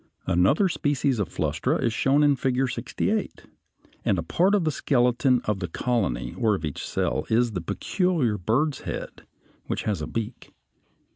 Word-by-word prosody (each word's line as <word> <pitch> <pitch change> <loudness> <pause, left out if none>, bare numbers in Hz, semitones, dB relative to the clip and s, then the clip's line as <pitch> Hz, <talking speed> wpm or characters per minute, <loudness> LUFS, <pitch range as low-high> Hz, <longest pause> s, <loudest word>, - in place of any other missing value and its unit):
Another 100 - +3
species 145 -6 0
of 100 - -1
Flustra - - -1
is 115 - 0
shown 135 +5 +3
in 145 -1 +4
Figure 130 0 0
68, 200 - -2 0.6
and 95 - +2
a 85 - -1
part 185 - +2
of 200 - +2
the 155 - +1
skeleton 125 -2 +2
of 105 -2 -1
the 90 - -3
colony 95 - -1
or 110 -2 +3
of 80 - -4
each 75 - -5
cell - - -1
is 120 +1 +2
the 90 -4 -3
peculiar 160 - 0
bird's 130 - +1
head - - -7 0.4
which - - -2
has 100 -7 -1
a 75 - -3
beak. 115 -2 -6
125 Hz, 165 wpm, -25 LUFS, 105-145 Hz, 0.6 s, in